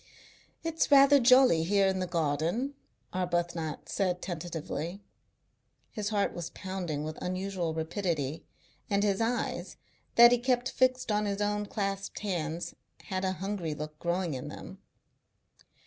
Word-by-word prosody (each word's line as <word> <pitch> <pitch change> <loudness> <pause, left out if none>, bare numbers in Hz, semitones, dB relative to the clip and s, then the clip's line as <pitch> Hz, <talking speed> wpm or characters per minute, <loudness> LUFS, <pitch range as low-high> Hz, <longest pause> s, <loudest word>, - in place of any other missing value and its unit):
"It's 330 0 0
rather 280 0 +7
jolly 250 -8 +6
here 195 +4 +3
in 190 -1 +1
the 185 - -1
garden," 170 - 0 0.4
Arbuthnot 175 -3 -2
said 180 -2 0
tentatively. 175 +1 -5 0.9
His 210 -2 -3
heart 205 -2 +1
was 170 -1 -5
pounding 180 -6 -4
with 155 0 -6
unusual 185 -2 -2
rapidity, 160 -3 -2 0.5
and 200 0 +2
his 200 0 +1
eyes, 235 +2 -2 0.4
that 235 0 +9
he 245 - +4
kept 250 0 +1
fixed 255 -2 +2
on 210 0 +1
his 200 0 -2
own 210 0 0
clasped 195 -2 -3
hands, 170 -5 -3 0.3
had 190 -2 -3
a 190 0 +1
hungry 190 -5 -3
look 150 +1 -7
growing 175 -1 -1
in 130 - -5
them. - - -9
190 Hz, 135 wpm, -30 LUFS, 170-210 Hz, 0.9 s, that